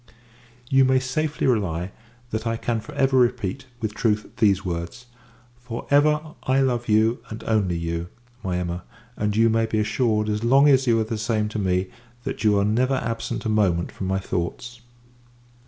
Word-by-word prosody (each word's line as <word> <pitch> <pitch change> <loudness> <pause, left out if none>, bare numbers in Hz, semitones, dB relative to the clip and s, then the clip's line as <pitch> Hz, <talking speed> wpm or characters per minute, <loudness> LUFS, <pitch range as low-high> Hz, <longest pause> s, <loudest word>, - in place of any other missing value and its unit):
You 135 +1 +4
may 130 0 +4
safely 150 +4 -2
rely, 95 -8 0 0.4
that 110 +1 -2
I 115 0 0
can 115 0 -1
for - - -11
ever 135 0 +2
repeat, 125 0 0
with 110 -2 -2
truth, 105 -1 -1
these 100 -4 +3
words 85 +7 -5 0.5
for 120 -1 -7
ever 150 +1 +5 0.2
I 130 +1 +1
love 120 -3 0
you, 110 +2 +3
and 110 - -7
only 100 -6 +1
you, 85 0 -3 0.4
my 90 -3 -1
Emma; 90 0 -3 0.3
and, 105 -1 -1
you 115 +1 +5
may 115 0 +2
be 110 - -1
assured, 110 0 +1
as 105 +1 -1
long 135 +4 +5
as 135 -2 +4
you 115 -1 +4
are - - +2
the 110 0 -4
same 110 -1 0
to 105 - -4
me, 95 -1 0 0.3
that - - -4
you 105 -2 +4
are 100 - +2
never 125 +5 +2
absent 115 -1 -3
a - - 0
moment 95 -6 +1
from 95 - -5
my 95 0 0
thoughts. 95 +7 -4
110 Hz, 185 wpm, -24 LUFS, 100-125 Hz, 0.5 s, ever